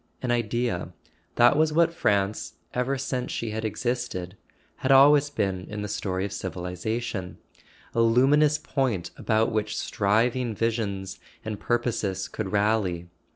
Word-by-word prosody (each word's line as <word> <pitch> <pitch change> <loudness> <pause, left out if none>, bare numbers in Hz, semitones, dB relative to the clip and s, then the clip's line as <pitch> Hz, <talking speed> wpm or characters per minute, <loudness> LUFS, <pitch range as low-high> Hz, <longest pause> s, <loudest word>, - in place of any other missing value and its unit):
An 125 - 0
Idea: 120 -6 -1 0.4
that 120 +3 +6
was 155 +1 +3
what 165 +1 +3
France, 100 -8 0 0.2
ever 125 +2 0
since 130 -2 -3
she 115 -2 -3
had 110 +1 -3
existed, 110 -4 -3 0.4
had 135 - 0
always 145 +2 +7
been 95 -9 -2
in 105 0 -4
the - - -3
story 95 -2 -2
of 100 - -5
civilization; 90 +2 -4 0.6
a 115 - +2
luminous 140 +6 +4
point 125 - -2
about 110 -1 +1
which 105 -1 -1
striving 115 +3 +1
visions 100 -4 -2 0.3
and 110 -2 -4
purposes 115 -5 -1
could 100 -4 -5
rally. 100 -5 +1
110 Hz, 135 wpm, -26 LUFS, 100-125 Hz, 0.6 s, always